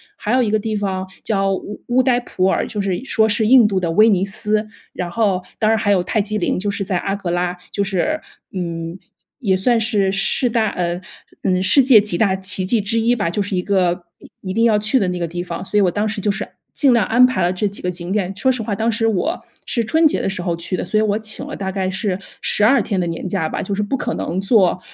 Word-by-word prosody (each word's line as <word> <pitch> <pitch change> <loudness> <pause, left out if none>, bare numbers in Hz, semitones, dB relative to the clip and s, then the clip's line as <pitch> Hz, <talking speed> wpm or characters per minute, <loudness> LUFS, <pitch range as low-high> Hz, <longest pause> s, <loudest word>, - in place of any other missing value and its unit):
还 220 - -1
有 255 - +3
一 215 - -1
个 215 - +2
地 215 +1 -3
方 190 -2 -2 0.2
叫 195 -2 0
乌 205 +2 -8
乌 250 +1 +3
代 245 -2 +3
普 190 -6 -2
尔， 190 - +1
就 210 - -5
是 195 +2 -2
说 220 -5 +2
是 215 0 +1
印 245 -2 +7
度 195 -2 0
的 175 -2 -2
威 215 +5 +6
尼 190 -3 +2
斯。 210 +2 -1 0.3
然 180 -1 -4
后 195 -1 0 0.2
当 215 - +1
然 - - +4
还 205 -1 -1
有 185 -3 +3
泰 215 - 0
姬 215 +1 -2
陵， 205 - 0
就 205 +2 -2
是 200 0 -2
在 185 -1 -1
阿 195 +3 -2
格 190 -4 -4
拉， 175 0 -1 0.2
就 200 - 0
是， 200 - -1 0.3
嗯， 170 -1 -4 0.4
也 195 -8 +1
算 230 +4 +2
是 205 -4 +2
世 195 +6 +1
大 225 -1 +1
呃， 175 0 -2 0.4
嗯， 185 -1 +1
世 205 +9 +6
界 250 -4 +7
几 205 -3 0
大 190 0 +2
奇 190 0 -1
迹 220 +5 +1
之 215 +3 0
一 235 +2 +2
吧， 205 -7 -1
就 205 - -1
是 200 0 -3
一 180 - -1
个， 180 -3 +1 0.2
嗯， - - -14
一 185 -1 -4
定 230 +3 +2
要 220 -2 +4
去 215 +5 +1
的 195 - 0
那 180 0 -2
个 170 -1 -2
地 175 +2 -5
方。 180 +1 -6
所 210 - +1
以 - - +4
我 185 - +3
当 210 +3 -1
时 210 -1 -3
就 210 - 0
是 - - -4 0.3
尽 280 -3 +3
量 230 -4 +3
安 245 +3 +5
排 255 0 0
了 175 +1 +1
这 195 +3 0
几 200 - -7
个 180 - -2
景 175 0 -6
点。 195 -2 -1
说 260 +6 +2
实 255 -2 -2
话， 210 - -3
当 225 +3 0
时 225 +1 0
我 225 - -1 0.2
是 235 - 0
春 320 +8 +2
节 - - -1
的 - - -1
时 190 -2 -3
候 175 -1 -1
去 170 +2 -3
的， - - -3
所 215 - -1
以 - - +2
我 210 -1 +1
请 220 0 -4
了 - - -6
大 190 -1 -4
概 190 -1 -2
是 190 0 -2 0.2
12 220 +7 +3
天 200 -4 -2
的 180 - 0
年 165 +2 -4
假 175 -4 -1
吧， - - -3
就 200 - -4
是 210 - -1
不 205 +6 -2
可 235 - -3
能 175 - -3
做 195 -3 +3
200 Hz, 290 characters per minute, -19 LUFS, 185-220 Hz, 0.4 s, 印